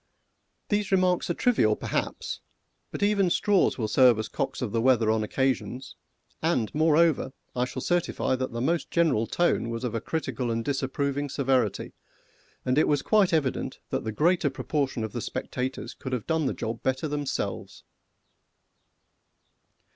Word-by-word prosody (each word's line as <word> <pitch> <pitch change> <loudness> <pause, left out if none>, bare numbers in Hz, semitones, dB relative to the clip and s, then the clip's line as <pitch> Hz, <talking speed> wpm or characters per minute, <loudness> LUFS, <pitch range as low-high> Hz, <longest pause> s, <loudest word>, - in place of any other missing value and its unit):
These 205 -1 0
remarks 185 -2 +2
are 175 - 0
trivial, 110 - +3
perhaps, - - -3 0.5
but - - -4
even 200 -3 +3
straws 200 +2 +2
will 110 -4 -1
serve 125 +1 +5
as 110 - -3
cocks - - -3
of 120 -5 -3
the 115 - 0
weather 120 -3 +4
on 110 0 +1
occasions, 130 +2 -2 0.5
and, 155 -9 0
moreover, 155 -3 +3 0.2
I 125 0 +1
shall 130 0 -6
certify 175 -6 0
that 130 0 -3
the 115 0 -4
most 165 +6 0
general 155 -10 +2
tone 175 -9 +1
was 115 +1 -4
of 120 -3 -2
a 115 - -2
critical 135 -6 -3
and 115 0 -1
disapproving 140 +1 -1
severity, 130 -6 0 0.7
and 130 +3 +2
it - - +3
was 145 -2 +1
quite 210 -4 +3
evident 150 -6 0
that - - -1
the 110 - -3
greater 160 - +2
portion 135 -2 -2
of 110 - -5
the - - -3
spectators 130 +1 -4
could 130 - -6
have 125 -4 -2
done 160 -3 +1
the - - -2
job 115 +1 -4
better 130 +4 -1
themselves. 145 -1 -4
135 Hz, 160 wpm, -27 LUFS, 120-165 Hz, 0.7 s, serve